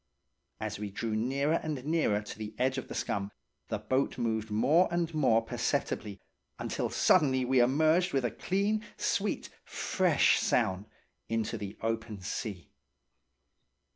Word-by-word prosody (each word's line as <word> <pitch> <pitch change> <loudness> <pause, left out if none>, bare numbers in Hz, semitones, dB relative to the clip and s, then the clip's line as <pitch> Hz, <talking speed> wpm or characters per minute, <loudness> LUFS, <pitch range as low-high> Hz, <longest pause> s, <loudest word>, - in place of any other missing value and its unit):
As - - -4
we 105 -1 -4
drew 110 +2 -3
nearer 140 +8 +1
and 145 -5 -4
nearer 150 -10 +1
to 105 - -8
the 105 0 -6
edge 130 +1 +1
of 130 - -8
the - - -7
scum, 100 0 -2 0.4
the - - -2
boat 130 +1 0
moved 110 -2 -1
more 150 +12 +4
and 170 -1 -1
more 125 -7 +3
perceptibly, 105 -2 -2 0.4
until - - -2
suddenly 130 -7 +3
we 130 +1 +3
emerged 155 +8 +3
with 135 -3 +1
a 120 - 0
clean, 205 +3 0
sweet, - - -1
fresh - - +2
sound 95 +3 +1 0.4
into 115 -1 -1
the 100 +1 -6
open 115 -2 -2
sea. 95 -1 -5
120 Hz, 140 wpm, -30 LUFS, 110-150 Hz, 0.4 s, more